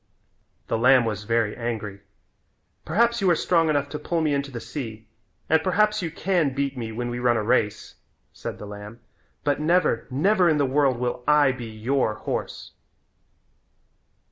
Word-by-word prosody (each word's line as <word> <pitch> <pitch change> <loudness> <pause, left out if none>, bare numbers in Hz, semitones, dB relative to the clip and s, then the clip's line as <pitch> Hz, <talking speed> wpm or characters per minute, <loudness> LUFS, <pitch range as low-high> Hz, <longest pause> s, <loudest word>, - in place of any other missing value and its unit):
The 115 - -1
lamb 125 0 +5
was 105 -2 -3
very 115 -1 +1
angry. 110 -4 -4 0.8
"Perhaps 235 +1 +2
you 190 - +3
are 175 - +5
strong 165 -1 +2
enough 145 -2 +1
to 150 - -5
pull 170 +3 -1
me 155 -2 +1
into 140 0 -1
the 120 -3 -6
sea, 115 -5 -7 0.4
and 160 0 +3
perhaps 210 +4 +2
you 170 - -2
can 165 -6 0
beat 140 -1 -1
me 115 -3 -5
when 120 +2 -4
we 120 - -4
run 120 -1 +2
a 110 - -1
race," 105 -1 0 0.4
said - - -6
the - - -9
lamb, 105 +2 -9 0.4
"but 145 -1 +1
never, 155 -5 +1
never 180 +7 +3
in 155 - +2
the 145 - +2
world 135 -1 +2
will 125 0 -3
I 150 -2 +5
be 125 -2 -7
your 110 +1 -1
horse." - - -5
135 Hz, 170 wpm, -24 LUFS, 115-155 Hz, 0.8 s, lamb